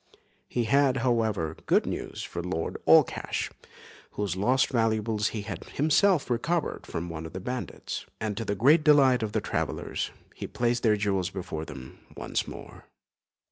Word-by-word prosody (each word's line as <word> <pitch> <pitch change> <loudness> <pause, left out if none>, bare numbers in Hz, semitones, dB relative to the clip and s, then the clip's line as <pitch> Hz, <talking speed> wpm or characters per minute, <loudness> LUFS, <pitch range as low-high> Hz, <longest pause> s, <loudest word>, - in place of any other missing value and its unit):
He 120 - -1
had, 135 +3 +3
however, 110 -10 +1
good - - +4
news - - -4
for 85 - -5
Lord 85 -2 -3
Allcash, - - +3 0.6
whose 100 -4 -2
lost 125 +8 +2
valuables 110 -2 +1
he 105 -3 -4
had 95 -5 -6
himself 160 +3 +3
recovered 150 +7 -1
from 85 +1 -4
one 80 -1 -6
of - - -13
the 95 - -4
bandits; 125 +6 -5
and 110 -1 -2
to 115 - -3
the 100 -1 -2
great 145 - +5
delight 135 -5 +5
of 110 -2 -3
the - - +1
travellers, - - -2 0.2
he - - -6
placed 120 0 0
their 110 -2 +3
jewels 95 -3 0
before 90 -5 -5
them 65 -3 -10 0.2
once - - -2
more. - - -10
110 Hz, 160 wpm, -28 LUFS, 95-125 Hz, 0.6 s, great